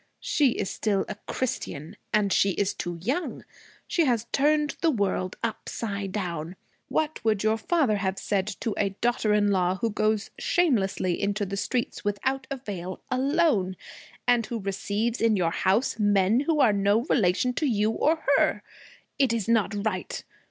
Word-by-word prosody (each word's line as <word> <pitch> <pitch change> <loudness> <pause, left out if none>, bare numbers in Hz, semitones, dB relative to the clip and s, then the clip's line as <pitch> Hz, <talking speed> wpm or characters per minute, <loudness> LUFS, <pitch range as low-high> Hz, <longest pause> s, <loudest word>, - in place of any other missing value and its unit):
She 280 -7 +3
is 200 - -2
still 200 -3 0
a - - -4
Christian. 160 - -4 0.2
And 205 -2 +2
she 195 -1 +3
is 200 +1 0
too 175 -1 -4
young. 285 - -2 0.4
She 335 - +1
has 235 -4 +1
turned 295 +1 +2
the 335 - +4
world 200 -7 -1
upside 210 -3 -3
down. 175 -4 -4 0.3
What 315 0 -1
would 215 -3 +1
your 220 0 +3
father 275 -5 +2
have 190 -1 -1
said 195 -1 -1
to 225 - -1
a 195 -1 0
daughter 235 -3 +1
in 205 -1 +3
law 185 -1 +2
who 225 +4 -1
goes 215 0 0
shamelessly 195 - +1
into 205 +1 0
the 195 +1 -4
street 240 +4 -2
without 260 +6 -1
a 275 - -3
veil, 185 -7 -6
alone, 260 - +2 0.5
and 245 -1 +4
who 235 - -3
receives 205 +4 -2
in 225 -1 +4
your 170 -3 +1
house 195 +8 +1
men 205 +1 +3
who 300 +2 +1
are 245 -7 +5
no 200 +2 +3
relation 235 - +2
to 305 +3 0
you 215 -3 +2
or 315 +7 +1
her? - - +2 0.6
It 270 -4 +4
is 230 -4 -1
not 215 -2 +1
right. 185 -4 -3
215 Hz, 165 wpm, -26 LUFS, 195-250 Hz, 0.6 s, are